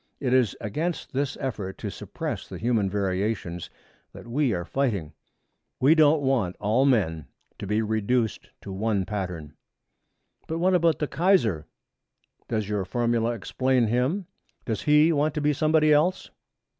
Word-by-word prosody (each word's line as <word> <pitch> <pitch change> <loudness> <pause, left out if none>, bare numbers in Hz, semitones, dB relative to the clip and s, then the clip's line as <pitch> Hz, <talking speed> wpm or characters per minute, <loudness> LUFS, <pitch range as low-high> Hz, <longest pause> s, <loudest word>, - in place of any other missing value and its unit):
It 130 -2 0
is 125 -6 +3
against 155 - -3
this 140 +1 -1
effort 105 -8 -4
to - - -5
suppress - - -5
the - - -8
human 110 -4 +1
variations 95 -2 -2 0.4
that - - -11
we 130 +2 +1
are 85 -4 -2
fighting. 100 - -1 0.7
We 135 +5 +6
don't 155 -2 +4
want 120 -10 +1
all 110 +6 +2
men 80 - +1 0.3
to 100 - -5
be 105 +2 +1
reduced 110 +1 -1
to 100 - -8
one 100 0 -1
pattern.' 90 -8 -5 0.9
'But 160 - -3
what 185 +3 +2
about 170 -2 +3
the 150 - -2
Kaiser? 135 - +2 0.8
Does 110 -3 -1
your 105 -2 -1
formula 115 +3 0
explain 130 +3 0
him? 125 - 0 0.4
Does 110 -3 -2
he 150 +2 +4
want 150 0 +1
to 150 - -1
be 150 0 +2
somebody 155 +1 +3
else?' 165 +5 +1
120 Hz, 150 wpm, -26 LUFS, 100-150 Hz, 0.9 s, We